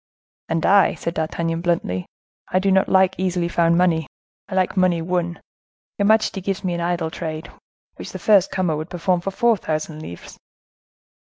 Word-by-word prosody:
"And 165 0 0
I," 200 0 +5
said 170 - -4
D'Artagnan, 165 +1 -2
bluntly; 165 - -1 0.4
"I - - +1
do 195 +1 +2
not 190 0 +3
like 190 0 +4
easily 180 -2 0
found 170 0 +2
money; 165 -4 +2 0.4
I 190 - -4
like 185 0 +1
money 185 -3 +3
won! 175 0 -2 0.6
Your 200 - +3
majesty 215 -2 +2
gives 195 +1 -3
me 180 -2 -1
an 170 - -3
idle 170 -2 -1
trade, 160 -1 -6 0.5
which - - -8
the - - -6
first 200 -4 +4
comer 180 -4 0
would 155 +3 -5
perform 180 0 0
for 195 - -3
four 230 +3 +2
thousand 155 -2 -4
livres." - - -10
175 Hz, 175 wpm, -21 LUFS, 165-190 Hz, 0.6 s, I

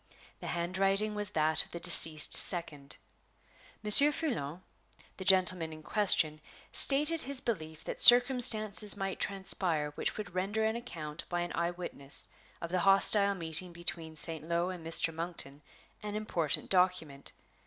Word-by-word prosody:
The - - -9
hand 175 +2 -5
writing 195 +2 -1
was 210 -1 -4
that 155 -4 +1
of - - -18
the 170 - -9
deceased 155 -2 +3
second. 150 -6 0 0.9
Monsieur 280 +8 +8
Foulon, 185 - -6 0.5
the 190 - -8
gentleman 185 -3 +1
in 155 0 -13
question, 155 -6 +1 0.3
stated 300 +4 0
his 275 0 -3
belief 160 -11 -7
that - - -8
circumstances 230 -5 +5
might 195 -1 -6
transpire 185 -6 -1
which - - -5
would 205 -4 -9
render 200 +4 -3
an 220 +1 -2
account 160 -10 -9
by 175 -1 -4
an 175 - -6
eyewitness 170 -5 0 0.3
of 170 - -8
the 185 - -2
hostile 200 +2 +4
meeting 170 +1 -1
between 165 -1 -6
St. 160 0 0
Lo 170 +2 -3
and 180 -3 -11
Mr. 165 0 +1
Monkton 160 -4 -4 0.4
an 210 -1 -8
important 175 -8 -3
document. 180 -7 -2
180 Hz, 145 wpm, -29 LUFS, 160-210 Hz, 0.9 s, Monsieur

